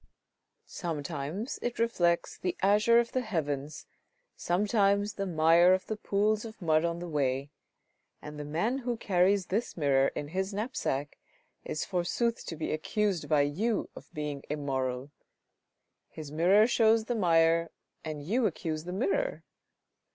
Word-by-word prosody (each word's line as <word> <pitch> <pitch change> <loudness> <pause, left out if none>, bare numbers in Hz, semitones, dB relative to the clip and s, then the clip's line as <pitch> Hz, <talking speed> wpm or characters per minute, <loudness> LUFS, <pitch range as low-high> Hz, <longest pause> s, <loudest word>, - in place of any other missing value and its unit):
Sometimes 160 - -4
it 240 0 -3
reflects 175 -7 +1
the 180 -1 -3
azure 210 +4 +5
of 235 0 -1
the 255 - 0
heavens, 150 - -3 0.5
sometimes 200 +2 +1
the 195 -1 -3
mire 170 +2 +5
of 190 - -5
the 220 - -3
pools 210 0 0
of 225 -1 -9
mud 160 -3 +2
on 170 0 -1
the 175 +1 -6
way, 140 -2 -1 0.7
and 150 0 -9
the - - -4
man 175 - -1
who 245 -2 -3
carries 190 -1 +2
this 215 +4 -2
mirror 135 -3 +3
in 145 - -4
his 190 +3 -2
knapsack 200 - -3 0.4
is 155 - -3
forsooth 200 +6 -1
to 165 - -4
be 155 - -3
accused 195 +3 -1
by 150 -2 +4
you 195 +11 -1
of - - -12
being 150 -2 -4
immoral! 135 -2 -2 1.0
His 155 -2 -9
mirror 180 +7 +5
shows 225 -2 +3
the 245 - -1
mire, 165 -4 +3 0.3
and 155 -2 -5
you 225 - +1
accuse 160 -3 -4
the 180 - -5
mirror 395 - -1
175 Hz, 145 wpm, -29 LUFS, 150-215 Hz, 1.0 s, azure